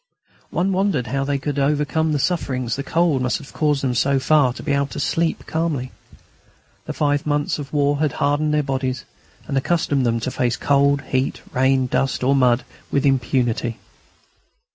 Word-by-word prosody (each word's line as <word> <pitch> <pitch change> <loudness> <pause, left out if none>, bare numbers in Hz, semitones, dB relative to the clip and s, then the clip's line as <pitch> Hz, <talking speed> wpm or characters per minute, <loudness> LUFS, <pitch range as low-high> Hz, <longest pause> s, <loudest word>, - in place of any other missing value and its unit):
One 185 +3 0
wondered 190 -9 +1
how 135 +3 -1
they 140 0 0
could 145 +1 -4
have 140 0 +3
overcome 150 +2 0
the 150 - +1
sufferings 130 -7 -1
the 140 - -3
cold 160 -1 +1
must 125 -1 0
have 145 - -13
caused 150 -3 +1
them 130 -2 +1
so 135 +3 +2
far 135 0 +3
as 125 - -6
to - - -8
be - - -2
able 140 0 +1
to 145 - -7
sleep 165 +3 -1
calmly. 155 -6 -2 0.9
The - - -4
five 145 0 0
months 145 0 0
of 140 -2 -7
war 145 -1 +1
had 150 -3 +1
hardened 145 +2 +1
their 150 0 +2
bodies 130 -3 -2 0.4
and - - -4
accustomed 145 -3 0
them 115 -1 +1
to 130 - -2
face 120 -2 0
cold, 140 0 +2
heat, 130 -1 -1
rain, 130 0 +2
dust, 130 +1 -1
or 135 +2 +3
mud, 125 -2 +3 0.2
with 140 0 0
impunity. 125 -3 0
140 Hz, 185 wpm, -21 LUFS, 130-150 Hz, 0.9 s, have